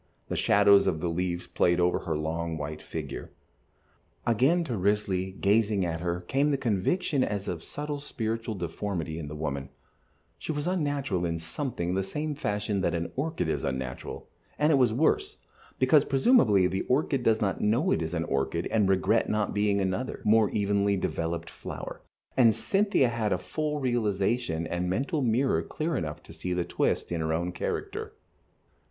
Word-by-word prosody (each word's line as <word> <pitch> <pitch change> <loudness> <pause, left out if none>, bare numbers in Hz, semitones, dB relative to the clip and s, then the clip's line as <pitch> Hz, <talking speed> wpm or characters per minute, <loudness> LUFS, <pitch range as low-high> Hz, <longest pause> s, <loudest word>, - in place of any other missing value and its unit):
The - - -2
shadows 100 0 +5
of 80 - +1
the 85 - -1
leaves 90 +1 -2
played 85 0 +2
over 90 0 +2
her 80 -4 -2
long, 80 +1 -2
white 75 0 -5
figure. - - -6 1.0
Again 135 +10 +3
to 125 -8 -3
Risley, 95 -1 0
gazing 100 0 +2
at 85 -1 -2
her, 90 0 -2
came 135 +11 +1
the 145 -2 +2
conviction 135 - +1
as 100 -1 -2
of 85 -3 -3
subtle 145 - -5
spiritual 115 -5 -3
deformity 85 -2 -3
in 75 - -5
the 75 - -7
woman; 70 -2 -3 0.7
she - - -4
was 145 -1 -2
unnatural 145 - 0
in 85 -1 -1
something 85 - -3
the 95 - +1
same 150 +11 -3
fashion 105 -7 -1
that 85 -2 +1
an 85 0 -3
orchid 135 - -1
is 80 - -1
unnatural, 65 -1 -4 0.3
and 150 +2 +3
it 145 - +5
was 125 -4 +4
worse, 395 - +1 0.4
because 135 +3 +5
presumably 130 - +4
the 95 +1 0
orchid 135 0 +1
does 110 -2 +3
not 100 -2 -1
know 120 - +2
it - - +2
is 80 +1 -3
an 80 - 0
orchid 70 +4 -1
and 105 -4 +3
regret 95 +4 +2
not 105 -1 0
being 105 -1 +2
another, 95 +7 -2
more 110 0 +5
evenly 100 -1 +1
developed, 85 -2 -2
flower, - - -7 0.3
and 115 -4 +5
Cynthia 195 - +2
had 115 -3 -1
a - - +2
full 150 - -3
realization 110 - 0
and 85 +2 -2
a - - -1
mental 135 - 0
mirror 125 +2 +2
clear 160 +1 -3
enough 75 - -4
to - - -13
see 90 - -3
the 90 -1 0
twist - - 0
in 85 -2 -1
her 80 0 -1
own 85 +2 -1
character. 90 - -4
100 Hz, 175 wpm, -28 LUFS, 85-130 Hz, 1.0 s, shadows